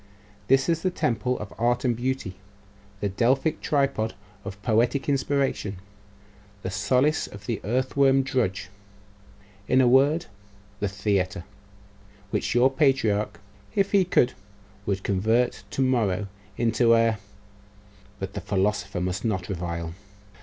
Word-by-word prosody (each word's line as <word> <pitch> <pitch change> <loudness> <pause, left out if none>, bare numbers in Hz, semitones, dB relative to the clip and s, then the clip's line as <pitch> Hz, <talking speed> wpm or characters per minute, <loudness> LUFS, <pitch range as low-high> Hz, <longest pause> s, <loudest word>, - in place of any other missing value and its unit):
This 135 0 +4
is 165 -1 +1
the 185 - +1
temple 125 -6 -1
of 105 -1 -8
art 120 +2 +1
and 120 -2 +2
beauty; 120 -6 -3 0.6
the 100 - 0
Delphic 130 - +1
tripod 140 -6 0 0.3
of 100 0 -7
poetic 120 +4 +1
inspiration; 135 -7 0 0.9
the 95 - -3
solace 125 +10 +1
of 100 -1 -12
the 115 -2 -3
earthworn 135 +4 +2
drudge; 105 -8 -1 1.0
in 130 - +4
a 130 - +5
word, 140 +6 +4 0.5
the 105 - 0
theatre; 100 -2 -1 0.9
which - - -1
your 125 +2 +5
patriarch, 130 -8 +1 0.4
if 200 0 +2
he 200 -2 +5
could, 130 -8 +2 0.5
would 100 0 -1
convert 110 +5 +1
to 135 - 0
morrow 110 -6 +1 0.3
into 115 0 +3
a 115 -2 +2 1.0
but 95 0 -5
the 100 - -4
philosopher 100 -2 -1
must 90 +2 -2
not 95 -6 -2
revile. 85 -2 -4
115 Hz, 125 wpm, -25 LUFS, 100-130 Hz, 1.0 s, a